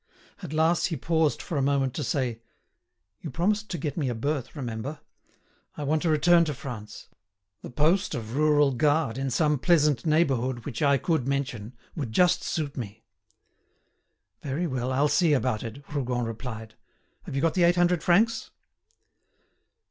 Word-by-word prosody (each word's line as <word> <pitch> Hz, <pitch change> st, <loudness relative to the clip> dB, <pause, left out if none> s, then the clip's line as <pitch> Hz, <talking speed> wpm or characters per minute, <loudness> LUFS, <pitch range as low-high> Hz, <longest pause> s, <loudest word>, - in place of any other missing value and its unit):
At -, -, -7 dB
last 160 Hz, +2 st, +2 dB
he 165 Hz, -, -3 dB
paused 160 Hz, +1 st, 0 dB
for 155 Hz, -, -2 dB
a -, -, +1 dB
moment 135 Hz, -2 st, +1 dB
to 150 Hz, -, -3 dB
say: 125 Hz, -7 st, -2 dB, 0.8 s
"You 160 Hz, -, -6 dB
promised 205 Hz, -, 0 dB
to 175 Hz, -, -3 dB
get 145 Hz, 0 st, -4 dB
me 140 Hz, -5 st, 0 dB
a 120 Hz, -, -2 dB
berth, 140 Hz, +4 st, -3 dB
remember. 130 Hz, +2 st, -5 dB, 0.8 s
I 150 Hz, -, -4 dB
want 155 Hz, +2 st, +1 dB
to 170 Hz, -, 0 dB
return 170 Hz, +3 st, +5 dB
to 150 Hz, -3 st, -3 dB
France. 110 Hz, -6 st, -8 dB, 0.5 s
The -, -, -8 dB
post 160 Hz, +10 st, +1 dB
of 115 Hz, 0 st, -5 dB
rural 150 Hz, -1 st, +4 dB
guard 145 Hz, 0 st, +1 dB
in 135 Hz, 0 st, -1 dB
some 150 Hz, +2 st, +1 dB
pleasant 150 Hz, -6 st, +3 dB
neighbourhood 130 Hz, -7 st, +1 dB
which 125 Hz, -6 st, -5 dB
I 140 Hz, -2 st, +4 dB
could 155 Hz, -4 st, -1 dB
mention, 130 Hz, -5 st, -3 dB, 0.2 s
would 135 Hz, -9 st, -4 dB
just 180 Hz, +7 st, +3 dB
suit 150 Hz, -4 st, -3 dB
me." 110 Hz, -2 st, -7 dB, 1.4 s
"Very 145 Hz, +5 st, -2 dB
well, 130 Hz, -4 st, -2 dB
I'll 140 Hz, +3 st, +2 dB
see 165 Hz, +1 st, +3 dB
about 125 Hz, -5 st, 0 dB
it," 120 Hz, +5 st, -8 dB
Rougon 125 Hz, -4 st, -1 dB
replied. 110 Hz, -1 st, -7 dB, 0.5 s
"Have -, -, -5 dB
you 135 Hz, -, 0 dB
got 165 Hz, -, +2 dB
the 180 Hz, -, 0 dB
eight 175 Hz, +1 st, +5 dB
hundred 175 Hz, -1 st, +2 dB
francs?" 220 Hz, +7 st, +2 dB
145 Hz, 165 wpm, -26 LUFS, 125-160 Hz, 1.4 s, return